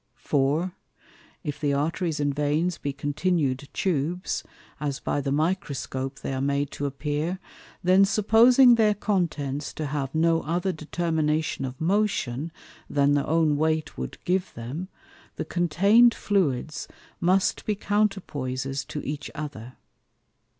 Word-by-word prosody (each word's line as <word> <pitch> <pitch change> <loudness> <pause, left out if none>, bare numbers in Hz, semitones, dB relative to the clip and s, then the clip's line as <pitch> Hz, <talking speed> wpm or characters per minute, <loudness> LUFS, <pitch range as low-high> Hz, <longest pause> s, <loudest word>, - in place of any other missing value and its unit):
For, 145 +6 +1 0.7
if 145 -4 -4
the 145 -2 +1
Arteries 160 +2 -1
and 145 -1 +1
Veins 150 +4 0
be 140 - -2
continued 145 -1 -1
Tubes, 175 +1 -1 0.4
(as 145 -1 -2
by 145 - -1
the 135 0 -2
Microscope 140 -4 -2
they - - -3
are 130 - -2
made 140 0 0
to 145 - -3
appear) 150 +5 -2 0.5
then 185 +2 +6
supposing 235 +5 +6
their 215 -3 +4
contents 155 -9 -1
to 155 - -4
have 140 -1 -3
no 165 +1 +3
other 175 +5 -1
determination 155 -3 -1
of 130 0 -7
motion, 165 - 0 0.4
than 145 0 +3
their 145 -1 +1
own 155 -2 +3
weight 155 0 0
wou'd - - -5
give 185 +1 0
them, 130 +11 -5 0.5
the - - -4
contain'd 200 +8 +4
Fluids 155 -7 0 0.3
must 185 +2 +2
be 210 - +1
Counterpoises 145 -11 -1
to 150 - -5
each 145 +1 -4
other. 135 -6 -6
155 Hz, 130 wpm, -26 LUFS, 140-180 Hz, 0.7 s, then